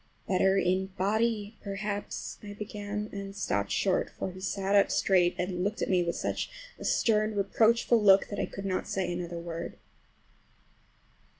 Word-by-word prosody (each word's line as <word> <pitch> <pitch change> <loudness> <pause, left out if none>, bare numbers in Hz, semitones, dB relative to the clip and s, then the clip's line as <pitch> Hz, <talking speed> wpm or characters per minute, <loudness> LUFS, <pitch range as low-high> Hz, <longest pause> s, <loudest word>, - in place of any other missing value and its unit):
"Better 190 +1 +3
in 190 0 +1
body 215 +2 0
perhaps"—I 205 0 -5
began, 210 0 -5
and 195 -1 -6
stopped 100 - -1
short, 190 -2 +1
for 190 - -5
he 185 +1 -11
sat 195 +1 -1
up 200 -1 +5
straight 180 -2 +3
and 180 0 -2
looked 205 +2 -1
at - - -1
me 180 -1 +4
with 170 -1 -1
such - - -2 0.3
a - - -7
stern, 215 -1 +2
reproachful 225 +3 +3
look 195 -1 +6
that 205 - -4
I - - 0
could 195 - -7
not 185 -1 -1
say 185 -2 -1
another 175 -1 -4
word. 170 0 -6
195 Hz, 160 wpm, -29 LUFS, 185-210 Hz, 0.3 s, look